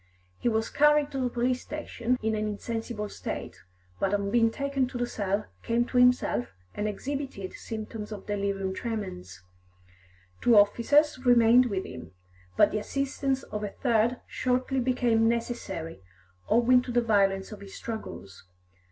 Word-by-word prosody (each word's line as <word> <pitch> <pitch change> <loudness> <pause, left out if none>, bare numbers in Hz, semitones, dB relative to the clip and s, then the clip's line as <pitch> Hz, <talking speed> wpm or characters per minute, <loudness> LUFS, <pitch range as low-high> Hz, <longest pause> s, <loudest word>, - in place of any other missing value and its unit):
He - - +1
was 220 0 -1
carried 295 0 +4
to 270 - -3
the 250 -1 0
police 245 +1 0
station 255 -5 -2
in 220 0 +1
an 215 0 -1
insensible 225 0 -4
state, - - -6 0.4
but 195 +1 +1
on 200 -1 -2
being 230 0 +4
taken 275 +1 -1
to 250 - -6
the 245 - 0
cell, 205 -2 -2 0.2
came 235 +1 +1
to 250 - -3
himself, 250 - +3 0.3
and 210 - -2
exhibited 260 -2 -4
symptoms 220 -1 -6
of 205 -2 -7
delirium 200 -2 -2
tremens. 95 - -5 1.0
Two 235 -3 +5
officers 255 +7 +4
remained 245 0 +6
with 195 -4 -2
him, 125 -6 -9 0.4
but - - +5
the 215 - -1
assistance 270 +2 -2
of 210 0 -5
a 205 - -2
third 235 +2 +1
shortly 255 +1 -1
became 240 -3 +2
necessary, 220 - -3 0.5
owing 250 +2 +5
to 250 - -6
the 240 0 +3
violence 195 -3 +2
of 210 -2 -9
his 195 -1 -10
struggles. 100 - -7
230 Hz, 150 wpm, -28 LUFS, 205-250 Hz, 1.0 s, remained